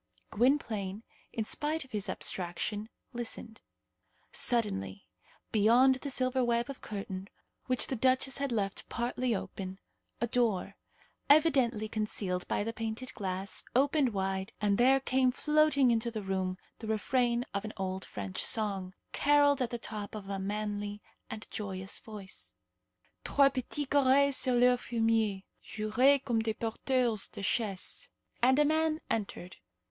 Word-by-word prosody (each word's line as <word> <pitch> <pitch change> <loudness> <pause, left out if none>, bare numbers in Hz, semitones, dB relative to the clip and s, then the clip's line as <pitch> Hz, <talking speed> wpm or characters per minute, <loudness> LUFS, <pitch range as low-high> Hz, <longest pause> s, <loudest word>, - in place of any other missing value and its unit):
Gwynplaine, 220 -5 +1 0.3
in 220 - -2
spite 300 +5 -2
of 265 - -22
his 210 -2 -3
abstraction, 205 +4 -1 0.2
listened. 230 -2 -6 0.7
Suddenly, 100 - -1 0.5
beyond 235 +5 +5
the 280 +2 -5
silver 255 -1 +1
web 235 +2 +1
of 270 - -11
curtain 195 -2 -6 0.4
which 255 -1 +3
the 265 - -2
duchess 260 +3 +2
had 280 -2 -1
left 200 -4 -2
partly 240 0 -1
open, 190 0 -5 0.4
a 235 - +1
door, 235 -5 0 0.5
evidently 265 -8 +4
concealed 210 -4 -2
by - - 0
the 230 +2 -3
painted 225 +3 -4
glass, 190 -1 -3
opened 275 0 +3
wide, 190 +1 -2
and 205 0 +1
there 265 +2 +6
came 260 -1 +2
floating 300 -1 +3
into 230 0 +1
the 220 -3 -5
room 190 -1 -1 0.2
the 225 - -7
refrain 240 +2 +1
of 200 0 -2
an 215 - -6
old 190 -1 -3
French 95 -2 -3
song, 195 -4 0 0.2
carolled 285 -1 +4
at 245 - 0
the 240 - -3
top 210 -2 -6
of 205 -2 -7
a 195 -1 -2
manly 205 +1 -3 0.3
and 220 - -6
joyous 190 -2 -3
voice, 190 - -7 0.7
"Trois 280 -1 +4
petits 270 +2 -3
gorets 280 0 +4
sur 255 -1 +3
leur 250 +1 +5
fumier 225 -5 0 0.2
Juraient 250 +6 +2
comme 235 -4 +1
de 220 -1 -1
porteurs 235 -1 0
de 200 - -7
chaise," 200 -2 -1 0.3
and 260 +2 +5
a 295 - +5
man 315 +1 +2
entered. 190 -4 -3
225 Hz, 140 wpm, -31 LUFS, 200-255 Hz, 0.7 s, there